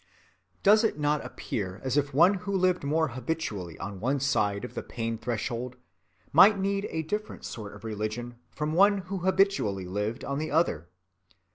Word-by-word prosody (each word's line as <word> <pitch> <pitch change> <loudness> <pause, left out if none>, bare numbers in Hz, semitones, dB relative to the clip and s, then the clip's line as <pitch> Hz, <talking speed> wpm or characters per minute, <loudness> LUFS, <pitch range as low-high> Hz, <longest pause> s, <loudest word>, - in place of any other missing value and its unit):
Does 215 +3 +6
it 220 - +1
not 150 0 +1
appear 95 -2 -5
as 130 -1 -1
if 145 -1 +1
one 170 +8 +5
who 195 +1 -2
lived 185 -2 +2
more 160 +2 +1
habitually 120 - -4
on 100 -1 -6
one 135 +6 0
side 105 -6 +1
of - - -9
the - - -4
pain‐threshold 115 +1 -3 0.6
might 205 +1 +8
need 195 +1 -1
a 160 - -2
different 210 +7 -4
sort 105 -3 -7
of 105 - -14
religion 110 +2 -4
from 150 +1 -3
one 200 +4 +5 0.2
who 195 - -1
habitually 185 - +1
lived 105 +5 -3
on 140 +1 -2
the 155 - -3
other? 90 - +1
140 Hz, 165 wpm, -28 LUFS, 110-180 Hz, 0.6 s, might